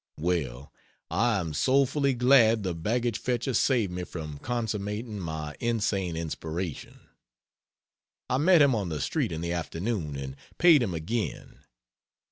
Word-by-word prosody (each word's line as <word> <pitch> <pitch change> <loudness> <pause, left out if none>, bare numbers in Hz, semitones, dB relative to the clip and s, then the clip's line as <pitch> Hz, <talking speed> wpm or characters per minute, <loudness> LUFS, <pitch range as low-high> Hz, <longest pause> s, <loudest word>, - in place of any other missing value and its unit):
Well, 75 -6 -2 0.4
I 115 -2 +2
am 80 -4 -4
soulfully 135 - +2
glad 120 -3 +5
the 90 -2 -1
baggage 115 +7 -1
fetcher 125 +1 -1
saved 115 -4 +2
me 90 0 -3
from 75 -5 -7
consummating 110 -2 -3
my 80 -4 -5
insane 100 -7 0
inspiration. 80 0 -5 1.3
I 130 - +1
met 170 0 +6
him 140 -2 +4
on 100 -6 -1
the 75 -2 -3
street - - -1
in 80 - -4
the 85 0 -2
afternoon 85 -1 -3
and 70 0 -6 0.2
paid 165 -5 +6
him 95 -8 -1
again. 105 +8 -4
100 Hz, 135 wpm, -28 LUFS, 80-120 Hz, 1.3 s, met